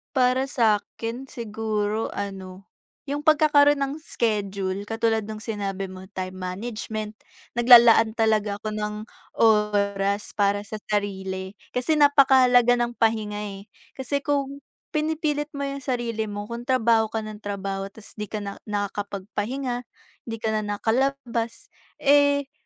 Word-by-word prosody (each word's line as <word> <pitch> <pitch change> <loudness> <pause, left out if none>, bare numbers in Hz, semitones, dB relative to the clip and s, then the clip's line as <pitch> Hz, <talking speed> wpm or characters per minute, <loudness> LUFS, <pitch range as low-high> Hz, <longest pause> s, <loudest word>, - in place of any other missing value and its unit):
Para 255 +1 +3
sakin 230 0 -1
siguro 220 -3 -3
ano, 190 -1 -7 0.4
yung 290 +1 -3
pagkakaroon 290 -2 +5
ng 275 +1 -1
schedule 200 -3 -2
katulad 225 0 0
nung 215 0 -7
sinabi 200 -3 -4
mo, 185 0 -10
time 185 -1 -5
management, 215 +3 -5 0.4
nag-lalaan 235 -2 +7
talaga 215 -2 +1
ako 215 0 -4
ng 210 0 -2 0.5
oras 205 -2 +2
para 205 0 +1
sa 215 - -6
sarili, 190 -1 -3 0.2
kasi 255 +5 +1
napaka-halaga 260 -4 +5
ng 240 0 0
pahinga 220 -2 +1 0.2
eh. 210 - -33 0.2
Kasi 275 +2 -2
kung, 280 -1 -2 0.3
pinipilit 305 -1 -1
mo 280 - -3
yung 275 0 -3
sarili 240 -4 -2
mo 205 0 -5
kung 235 +3 -7
trabaho 230 -3 +3
ka 220 0 -3
ng 215 -1 -8
trabaho 195 -1 -4
tapos 210 +2 -14
di 210 - -3
ka 210 0 -5
na 200 0 -6
nakakapagpahinga, 210 +5 -3 0.4
hindi 225 - -3
ka 220 - +1
na 215 - +1 0.2
nakalabas, 240 - -1 0.2
eh, 285 -1 +3
220 Hz, 130 wpm, -24 LUFS, 205-255 Hz, 0.5 s, nag-lalaan